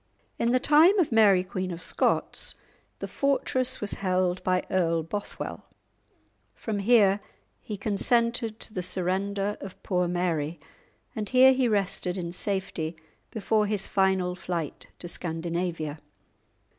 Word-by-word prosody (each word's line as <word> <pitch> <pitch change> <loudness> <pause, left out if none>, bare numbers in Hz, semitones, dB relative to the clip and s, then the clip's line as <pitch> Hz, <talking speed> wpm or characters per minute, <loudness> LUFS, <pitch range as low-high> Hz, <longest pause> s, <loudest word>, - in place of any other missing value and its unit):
In 235 - +2
the 255 - +3
time 315 +9 +5
of 350 -9 +2
Mary 205 -5 +5
Queen 185 0 -4
of 175 0 -6
Scots - - 0 0.4
the - - -5
fortress 260 -2 0
was 205 - -2
held 185 -1 0
by 185 0 +1
Earl 165 -3 +1
Bothwell; 205 +6 -6 0.9
from 215 -3 -3
here 205 -2 +4 0.4
he 210 - -6
consented 230 +2 +1
to - - -6
the 185 - -2
surrender 195 +3 -1
of 195 -1 -9
poor 180 -1 0
Mary, 170 -3 -1 0.6
and 215 -3 -3
here 260 +1 +7
he 255 -1 +2
rested 195 -3 0
in 170 -2 -4
safety 180 -4 -2 0.3
before 215 -1 0
his 205 -2 0
final 190 -2 +1
flight 170 -4 -5
to 175 - -6
Scandinavia. 165 -2 -3
190 Hz, 130 wpm, -27 LUFS, 180-220 Hz, 0.9 s, here